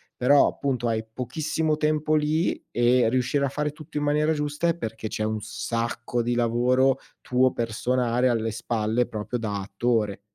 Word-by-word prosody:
Però 140 +3 +5
appunto 125 -4 -2
hai 110 -1 0
pochissimo 155 +5 -1
tempo 155 0 +1
lì 155 +2 +1
e 120 0 +3
riuscire 130 +3 +1
a 135 - -1
fare 150 +2 -2
tutto 150 0 -9
in 145 - 0
maniera 150 +1 +2
giusta 150 +2 -1
è 170 - +2
perché 110 -7 -5
c'è 110 - -3
un 110 0 -2
sacco 120 +2 -2
di 120 +1 -1
lavoro 125 +3 +2 0.2
tuo, 130 +1 +2
personale, 120 +2 0
alle 115 -2 0
spalle, 110 +1 -1
proprio 110 +3 -4
da 105 -3 -3
attore. 105 0 -1
125 Hz, 160 wpm, -25 LUFS, 115-145 Hz, 0.2 s, Però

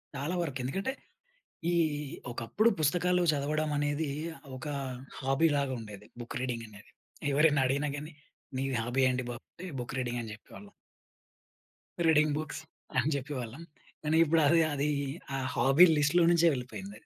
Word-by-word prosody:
చాలా 145 +6 -2
వరకెందుకంటే 145 - -2 0.8
ఈ - - +1 0.6
ఒకప్పుడు 120 - +1
పుస్తకాలు 180 +4 +2
చదవడమనేది 145 +1 0 0.5
ఒక 130 - -8 0.5
హాబీలాగుండేది 135 -7 0
బుక్ 120 - -6
రీడింగనేది. 115 -5 -5 0.4
ఎవరైనా 145 -1 +4
అడిగినా 140 +3 0
గానీ 150 +3 -7 0.5
"నీ 135 - 0 0.2
హాబీ 120 +4 0
ఏంటి 125 0 -1
బాబు?" 120 -1 -7
అంటే 185 - -9
బుక్ 120 +2 -6
రీడింగని 120 -3 -3
జెప్పేవాళ్ళం. 205 - -14 1.3
రీడింగ్ 155 -2 +4
బుక్స్ 155 0 -5 0.4
అని 155 - +2
జెప్పేవాళ్ళం. 135 0 -4 0.4
కానీ 155 +1 +1
ఇప్పుడది 165 0 +4
అదీ 145 +1 0 0.5
ఆ - - -1 0.2
హాబీ 135 +7 +7
లిస్ట్‌లో 150 +4 +4
నుంచే 170 0 +5
వెళ్ళిపోయిందది. 140 +10 -7
145 Hz, 115 wpm, -30 LUFS, 125-160 Hz, 1.3 s, హాబీ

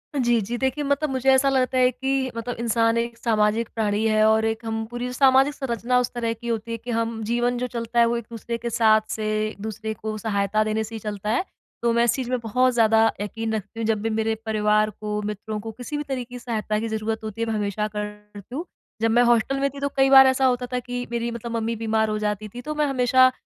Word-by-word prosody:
अ, - - 0
जी, 240 0 +4
जी। 235 +4 -3
देखिए 265 +3 -1
मतलब 285 +2 0
मुझे 265 0 +1
ऐसा 270 +1 +4
लगता 260 -1 +1
है 250 0 +5
कि 265 +2 -3 0.2
मतलब 235 +1 -4
इंसान 230 0 +2
एक 235 0 -2
सामाजिक 220 -1 +1
प्राणी 215 -1 0
है 215 0 +3
और 220 0 +3
एक 225 +1 -8
हम 225 0 -2
पूरी 240 +1 -4
सामाजिक 270 +2 +4
संरचना 250 -3 0
उस - - -4
तरह 230 -2 -1
की 230 +1 -10
होती 230 -1 -2
है 230 - -2
कि 245 +2 -7
हम 230 0 -2
जीवन 240 +2 0
जो 250 +1 -2
चलता 235 0 -1
है 235 - +7
वो 235 - +1
एक-दूसरे 235 0 -5
के 235 +1 -4
साथ 220 -1 +4
से 215 - -4 0.2
एक-दूसरे 220 +1 -5
को 215 0 -3
सहायता 205 0 +1
देने 220 +1 0
से 225 +1 -8
ही 220 - -5
चलता 210 -1 -5
है। - - 0 0.4
तो 235 - +2
मैं 235 - +3
इस 240 - +3
चीज़ 255 -3 -3
में 255 0 0
बहुत 250 +3 +2
ज़्यादा 225 -1 +4 0.2
यकीन 220 +2 -3
रखती 215 +1 -5
हूँ 225 - -1
जब 215 -2 -2
भी 225 - -1
मेरे 220 0 0
परिवार 215 -1 +2
को, 210 0 -4
मित्रों 210 +1 -4
को, 225 +2 -6
किसी 245 +6 -6
भी 295 - -2
तरह 265 -3 -3
की 245 - -6
सहायता 215 -3 -2
की 225 - -2
ज़रूरत 220 +1 -2
होती 220 +1 -6
है 230 - 0
मैं 225 - -1
हमेशा 210 0 -1
करती 210 +1 -8
हूँ। 330 - -3 0.4
जब 225 0 +2
मैं 240 +2 +5
हॉस्टल 240 +3 +2
में 275 0 +1
तो 280 0 -1
कई 270 0 +5
बार 265 0 +9
ऐसा 265 0 +2
होता 250 -1 +2
था 250 - +1
कि 245 0 -3
मेरी 235 0 -1
मतलब 235 0 -6
मम्मी 230 +1 -1
बीमार 220 0 +1
हो 215 - -1
जाती 210 0 -2
थी, 245 +4 -8
तो 305 +4 -5
मैं 300 0 +2
हमेशा 255 -1 +4
230 Hz, 250 wpm, -24 LUFS, 215-250 Hz, 0.4 s, बार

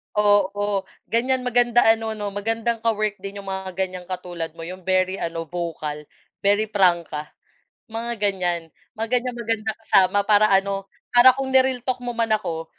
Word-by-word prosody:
Oo, 205 -1 +2 0.2
ganyan 255 +2 +1
maganda 240 -1 +3
ano 225 0 +2
'no 205 -1 -4
magandang 225 +3 -1
ka-work 215 -3 -1
din 195 +1 -7
'yong 195 -1 -6
mga 190 -1 -5
ganyang 185 -1 -3
katulad 175 -3 -5
mo 165 - -8
'yong 185 +2 -7
very 185 0 +1
ano 165 0 -3
vocal 155 -3 -5 0.3
very 205 +2 +1
prangka, 175 -6 +1 0.6
mga 230 +1 -5
ganyan. 180 -5 -1 0.2
Mga 225 +1 -2
ganyang 245 -1 -5
maganda 225 -2 -1
kasama 195 -1 +4
para 210 0 +5
ano, 195 0 +1 0.3
para 250 +1 +8
kung 265 -1 -3
ni-realtalk 255 -1 +2
mo 245 -1 -5
man 225 -1 +1
ako 165 -6 -2
205 Hz, 155 wpm, -23 LUFS, 185-230 Hz, 0.6 s, para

